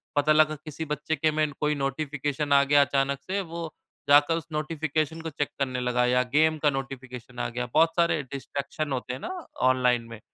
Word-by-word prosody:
पता 145 +1 +3
लगा 155 0 +4
किसी 160 +1 -6
बच्चे 150 +1 -2
के 155 +1 +1
में 155 -1 0
कोई 150 0 +1
नोटिफिकेशन 145 +1 -2
आ 140 0 +6
गया 145 +1 +5
अचानक 140 -1 +1
से 195 +2 -2
वो 170 -2 -6 0.4
जाकर 145 +3 +6
उस 165 -1 -7
नोटिफिकेशन 155 +1 -2
को 160 - -4
चेक 145 -1 -2
करने 130 -2 -1
लगा 125 0 +1
या 125 +1 +3
गेम 155 +1 +4
का 150 - +5
नोटिफिकेशन 130 -3 -6
आ 120 - 0
गया, 125 +1 -3
बहुत 165 +1 +4
सारे 170 -2 +2
डिस्ट्रैक्शन 140 +2 -5
होते 125 -1 -3
हैं 130 - -6
ना - - -6 0.4
ऑनलाइन 125 -2 +2
में। 115 -2 -9
145 Hz, 195 wpm, -26 LUFS, 135-155 Hz, 0.4 s, आ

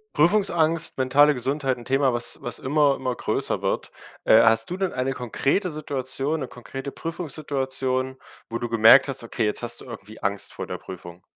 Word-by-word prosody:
Prüfungsangst, 170 -6 +2
mentale 140 +3 +4
Gesundheit, 135 +1 -1
'n 120 - -11
Thema, 135 0 +2
was 120 0 -3
was 120 - -5
immer 145 +1 +2
immer 130 -2 -3
größer - - -2
wird. - - -2 0.3
Äh, 110 - +7
hast 115 +8 +3
du - - -1
denn 190 -2 -1
eine 130 +1 -1
konkrete 135 - -1
Situation, 145 0 -3
'ne 135 - -4
konkrete 135 +3 -8
Prüfungssituation, 135 -5 -3 0.3
wo 115 - -2
du 120 0 -4
gemerkt 115 +4 +7
hast: 135 -3 -4
Okay, 115 0 -2
jetzt 105 - -1
hast 120 0 -5
du - - -11
irgendwie 110 -3 -10
Angst 100 0 -2
vor - - -5
der - - -6
Prüfung? 90 -1 -10
130 Hz, 180 wpm, -24 LUFS, 120-145 Hz, 0.3 s, Äh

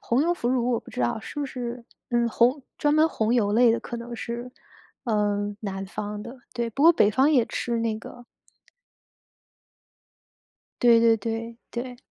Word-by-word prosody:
红 245 +4 +1
油 345 +2 +2
腐 245 -9 -2
乳 250 -1 +1
我 235 - +1
不 - - -14
知 - - -4
道， 120 - 0
是 290 +6 -7
不 285 - -1
是 245 -2 -6 0.3
嗯， 240 -1 +2
红 245 +5 +2 0.2
专 295 0 +2
门 310 +1 +5
红 225 -5 0
油 205 -4 +2
类 235 +1 +5
的 230 - -1
可 240 - -6
能 235 0 -7
是， 240 +2 -6 0.5
呃， 205 -3 0
南 195 -2 -4
方 210 +1 -5
的， 240 +4 -10
对， 235 -1 -2
不 275 +7 0
过 335 - +9
北 210 -10 +4
方 265 +7 +3
也 250 -6 +4
吃 235 -1 -2
那 225 -1 -1
个。 245 +2 -11 2.6
对 235 -1 +6
对 230 -1 +5
对， 230 +2 -4
对。 245 +1 -5
235 Hz, 195 characters per minute, -25 LUFS, 220-250 Hz, 2.6 s, 过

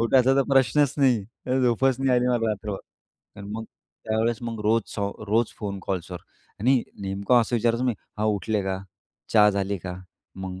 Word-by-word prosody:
उठायचा 130 +3 +4
तर 135 - +5
प्रश्नच 135 +2 +4
नाही, 125 -7 +3 0.4
झोपच 125 +2 +3
नाही 135 0 +1
आली 125 - +1
मला 120 -2 +1
रात्रभर. 105 -1 -4 0.6
आणि 100 0 -8
मग 110 +1 -4 0.4
त्यावेळेस 110 +1 0
मग 115 -2 -4
रोज-रोज 110 0 0
फोन 100 -2 -4
कॉल्सवर. 90 -2 -3 0.4
आणि 125 +2 +3 0.2
नेमकं 100 +5 +2
असं 120 +2 0
विचारायचो 115 +2 +1
मी 125 - +2 0.3
हां, 110 - +1
उठले 105 0 0
का? 95 0 -2 0.5
चहा 105 -1 +7
झाली 100 0 -1
का? 90 +1 -6 0.4
मग 95 -1 -6
110 Hz, 160 wpm, -25 LUFS, 100-120 Hz, 0.6 s, चहा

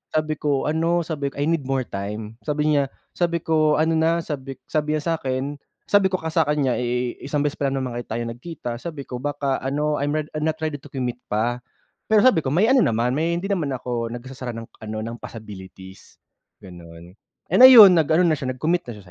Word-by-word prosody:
sabi 155 -1 0
ko 145 0 0
ano, 165 +2 +1
sabi 155 -4 -3
ko, 140 - -7
"I 145 - -1
need 155 -3 0
more 135 -1 0
time." 105 +2 -6
Sabi 150 +1 +1
niya, 140 -2 +2 0.2
sabi 170 -2 -1
ko, 155 -2 +2
"Ano 160 +2 +2
na?" 165 +1 +2
Sabi 135 -4 -6 0.2
sabi 150 0 0
niya 155 - -3
sa 165 +1 0
akin, 135 +2 -3 0.2
Sabi 205 -2 +3
ko 190 - -2
kasi 160 -2 -2
sa 155 - +2
kanya 145 -4 +1
eh, 125 0 -2
"Isang 145 +1 -2
beses 145 - -2
pa 140 - +1
lang 135 -1 -2
naman 120 -2 -4
tayo 115 +2 -3
nagkita." 120 0 -6
Sabi 155 -1 -6
ko, 125 -2 -7
"Baka 140 0 -2
ano, 150 +2 -1
I'm 145 +2 -1
rea 155 - 0
I'm 155 0 -2
not 160 - 0
ready 155 -2 -2
to 145 - -14
commit 125 -3 -4
pa." 120 +4 -1 0.5
Pero 215 -1 +4
sabi 255 -9 +5
ko, 145 - -4
"May 215 +8 +4
ano 265 - +5
naman, 120 - +2
may, 165 +5 0
hindi 195 +4 -3
naman 175 -7 0
ako 120 -2 -3
nagsasara 125 -1 -7
ng 115 - -6 0.2
ano, 110 -1 -6
ng 115 +1 -6
possibilities." 95 -4 -11 0.5
Gano'n. 85 -1 -12 0.4
And - - +3
ayun 210 -9 +10
nag 155 - +1
ano 180 - +4
na 170 - +3
siya, 130 -1 -3
nag-commit 170 +5 -1
na 120 - -5
siya 105 - -13
145 Hz, 220 wpm, -23 LUFS, 120-160 Hz, 0.5 s, ayun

